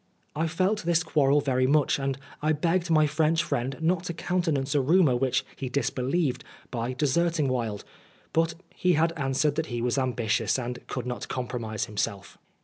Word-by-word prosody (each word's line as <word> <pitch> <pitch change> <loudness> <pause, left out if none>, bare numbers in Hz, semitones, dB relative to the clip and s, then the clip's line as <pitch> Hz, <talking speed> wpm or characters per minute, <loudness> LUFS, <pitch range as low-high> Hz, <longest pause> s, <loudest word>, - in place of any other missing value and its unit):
I 160 +2 0
felt 185 +6 0
this 170 0 +2
quarrel 145 -3 +3
very 130 -2 +1
much, 145 0 +3
and 135 -1 -1 0.2
I 150 - -1
had 155 -2 +2
begged 175 +1 +1
my 155 -2 +5
French 155 +2 +2
friend 130 +2 -2
not 170 +1 +1
to 170 - -3
countenance 160 -6 0
a 145 - +3
rumour 155 -1 +4
which 130 0 +1
he 130 - -4
disbelieved 135 +2 0 0.3
by 120 +1 -2
deserting 155 +3 +1
Wilde, 115 -5 -2 0.5
but 165 0 +2 0.2
he 180 -1 +2
had 165 +1 +2
answered 140 0 +1
that 160 0 -1
he 120 -1 -3
was 125 +3 0
ambitious, 120 -4 0
and 125 -1 -4
could 125 - -4
not 125 -1 -4
compromise 120 -4 -3
himself. 100 -3 -4
140 Hz, 175 wpm, -27 LUFS, 125-165 Hz, 0.5 s, my